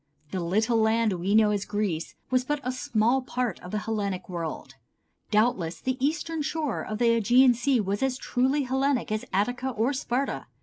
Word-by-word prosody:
The 190 - -2
little 215 +7 +1
land 220 -1 +2
we 185 +3 0
know 215 -1 +5
as 205 -2 0
Greece 200 -7 -2 0.2
was 255 0 +3
but 295 +3 -1
a 255 - -1
small 240 0 +1
part 250 -2 -2
of 180 - -10
the 210 - -2
Hellenic 205 -4 -3
world. 170 -3 -5 0.6
Doubtless 210 -7 +1
the 260 0 -3
eastern 320 +2 -1
shore 300 -4 -2
of 215 - -4
the 240 - +1 0.2
Ægean 245 +4 +6
Sea 245 +2 +1
was 200 -1 -1
as 265 -1 0
truly 265 +3 +1
Hellenic 265 -2 0
as 215 0 -2
Attica 245 +7 0
or 240 +3 0
Sparta. 265 0 -2
235 Hz, 180 wpm, -27 LUFS, 210-260 Hz, 0.6 s, Ægean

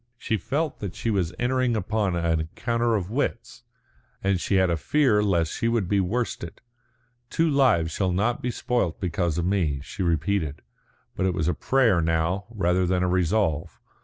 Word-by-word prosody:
She 110 - -1
felt 145 - -2
that 100 -5 -5
she 115 - -2
was 95 -5 0
entering 125 -1 +1
upon 105 -2 0
an 85 -1 +1
encounter 115 +8 -1
of 100 -1 -3
wits, 140 +5 -3 0.6
and 95 -2 +1
she 100 - 0
had 95 -2 +3
a - - +2
fear 130 - +2
lest 85 -6 +1
she 115 - -1
should 115 -6 0
be 100 +2 +2
worsted. 95 -2 -2 0.7
"Two 165 - +1
lives 130 - +3
shall 95 +2 0
not 110 +7 0
be 125 - -2
spoilt 120 -7 -1
because 85 -3 -1
of 85 - 0
me," 85 -8 0
she - - -7
repeated, 80 -2 0 0.5
but 95 - 0
it 90 - -1
was 80 - 0
a 90 - +2
prayer 115 - +2
now, 80 +4 0
rather 90 -4 +1
than 90 0 +1
a - - +1
resolve. 90 -3 0
95 Hz, 180 wpm, -25 LUFS, 85-115 Hz, 0.7 s, had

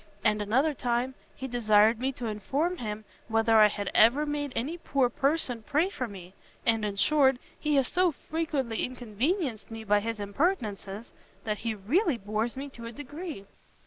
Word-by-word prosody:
and 210 -1 +2
another 260 +9 +2
time, 245 0 -1 0.2
he 265 - -5
desired 220 -2 +4
me 265 +2 0
to 250 -2 -7
inform 275 +11 -1
him 215 -4 -5 0.2
whether 225 0 +3
I 215 -1 +8
had 205 -1 -4
ever 250 +7 +5
made 290 -1 -2
any 275 +9 -2
poor 270 -6 +1
person 275 -3 0
pray 300 - +1
for 250 - -3
me! 185 -3 -11 0.3
and, 225 -2 +3
in 205 -1 -2
short, 270 +4 +4 0.2
he 300 -1 +1
has 270 -2 +3
so 360 0 +2
frequently 295 -6 -2
inconvenienced 250 - -2
me 225 -1 -7
by 210 -1 +3
his 225 +2 -3
impertinences, 205 - -2 0.3
that 210 -2 -2
he 225 -1 -2
really 280 - +1
bores 215 +4 -2
me 275 +1 -4
to 235 -3 -9
a - - -6
degree." 290 - -7
240 Hz, 175 wpm, -28 LUFS, 215-290 Hz, 0.3 s, I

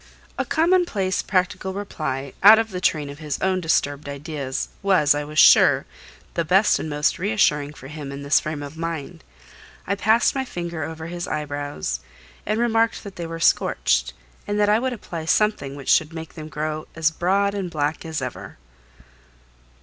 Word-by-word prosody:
A - - -2
commonplace, 320 - +1
practical 185 0 -1
reply, 155 -9 -4
out 210 +3 +9
of 225 -1 -1
the 180 -1 -4
train 150 -5 +1
of 145 - -11
his 150 -2 -4
own 190 -1 0
disturbed 145 -3 0
ideas, 140 -2 -4
was, 185 -7 +4
I 145 0 -2
was 150 +1 -9
sure, - - +6 0.5
the 170 - 0
best 190 +6 +3
and 160 - -4
most 150 +1 0
reassuring 160 -8 +1
for 135 - -12
him 145 -1 -7
in 140 0 -7
this 140 +1 +4
frame 155 -1 -5
of 145 +2 -8
mind. 165 - -5 0.6
I 200 - 0
passed 215 +4 +3
my 270 - -1
finger 170 - -5
over 160 +1 -6
his 175 +1 -5
eyebrows, 145 - -3 0.5
and 215 +2 0
remarked 230 -1 +1
that 200 -3 -9
they 170 -1 -5
were 165 0 -6
scorched, - - +2 0.3
and 205 0 -1
that 205 0 +3
I 210 +1 +4
would 260 +2 -1
apply 170 -8 -6
something 160 -7 +1
which 140 -2 +3
would 160 +1 -12
make 160 -1 -8
them 155 -1 -8
grow 155 0 -4
as 160 0 +2
broad 195 +4 +1
and 195 -3 -3
black 150 -1 -2
as 160 -4 -4
ever. 125 - -7
160 Hz, 180 wpm, -23 LUFS, 145-200 Hz, 0.6 s, out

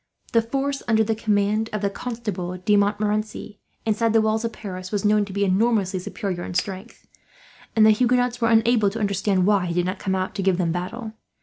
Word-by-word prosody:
The 230 - +5
force 275 +4 -2
under 220 -1 +3
the 225 +1 0
command 215 0 0
of 215 -1 -3
the 200 - +2
Constable 205 -7 -4
de 205 +3 +2
Montmorency, 210 +1 -1 0.3
inside 225 +1 +1
the 225 - +5
walls 220 +1 0
of 230 - -2
Paris, 185 -4 -7
was 205 -1 -1
known 210 0 +3
to 200 - -10
be 200 +1 0
enormously 195 -1 +1
superior 180 0 -4
in 175 - -6
strength; 195 +4 -4 0.7
and 220 -1 +6
the 220 - +7
Huguenots 245 +2 +1
were 230 - +3
unable 225 -2 +4
to 220 +3 -6
understand 200 -2 +1
why 200 -3 +2
he 170 - -3
did 175 0 +1
not 185 +1 -3
come 190 -1 -1
out 185 0 -2
to 200 - -3
give 190 -2 +2
them 170 -3 0
battle. 215 +6 -5
210 Hz, 210 wpm, -23 LUFS, 190-225 Hz, 0.7 s, the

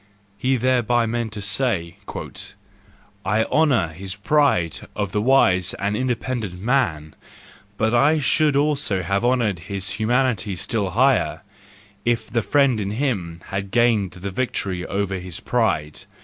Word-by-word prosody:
" - - -36
He 130 +1 +2
therewith 120 -2 +2
meant 115 -1 -2
to 105 -2 -6
say, 100 -5 0
" - - -10 1.1
I 110 +1 +2
honour 125 - +2
this 95 +2 -6
pride 105 - +2 0.2
of 100 -2 -2
the 105 - 0
wise 95 -8 +3
and 100 +1 -1
independent 120 -5 -2
man, 95 - 0 0.6
but 110 +1 +1
I 145 +6 +4
should 150 0 +2
have 105 - +1
honoured 120 -7 +1
his 95 +1 -4
humanity 110 -3 0
still 100 +2 -2
higher 130 +8 +2 0.6
if 120 -1 -1
the 115 - +1
friend 140 -1 +2
in 100 - -2
him 100 -9 -2
had 100 0 -3
gained 110 -4 +2
the 95 +2 -6
victory 95 -5 -2
over 100 -1 -2
his 90 -1 -7
pride. 80 -11 -1
110 Hz, 140 wpm, -22 LUFS, 95-125 Hz, 1.1 s, I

